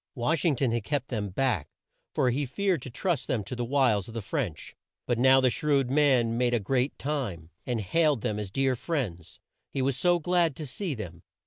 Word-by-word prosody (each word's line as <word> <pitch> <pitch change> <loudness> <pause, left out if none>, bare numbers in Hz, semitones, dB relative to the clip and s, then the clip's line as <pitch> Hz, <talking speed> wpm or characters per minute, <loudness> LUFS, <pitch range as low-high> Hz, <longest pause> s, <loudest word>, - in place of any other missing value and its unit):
Wash 140 +6 0
ing 155 -5 +4
ton 130 -1 +1
had 115 -2 -1
kept 140 +1 -2
them 105 -5 -2
back, 110 - 0 0.5
for 125 - +3
he 140 +5 0
feared 185 +3 0
to 130 - -7
trust 170 +6 -1
them 115 -5 0
to 100 - -6
the 120 - -2
wiles 120 -6 +2
of 115 - -10
the 115 - -2
French. 105 - -4 0.3
But 120 -2 0
now 130 +1 +6
the 130 -2 +3
shrewd 140 -3 +1
man 130 -5 +3
made 120 -1 +2
a - - +2
great 125 +6 0
time, 110 - -3 0.2
and 120 -2 0
hailed 150 - +2
them 105 0 -1
as 105 -2 -4
dear 135 +5 +1
friends. 115 - -4 0.3
He 135 - -2
was 135 0 +1
so 175 +7 +3
glad 170 -2 +1
to 155 - -6
see 155 +3 -3
them! 90 -7 -8
130 Hz, 215 wpm, -28 LUFS, 115-145 Hz, 0.5 s, now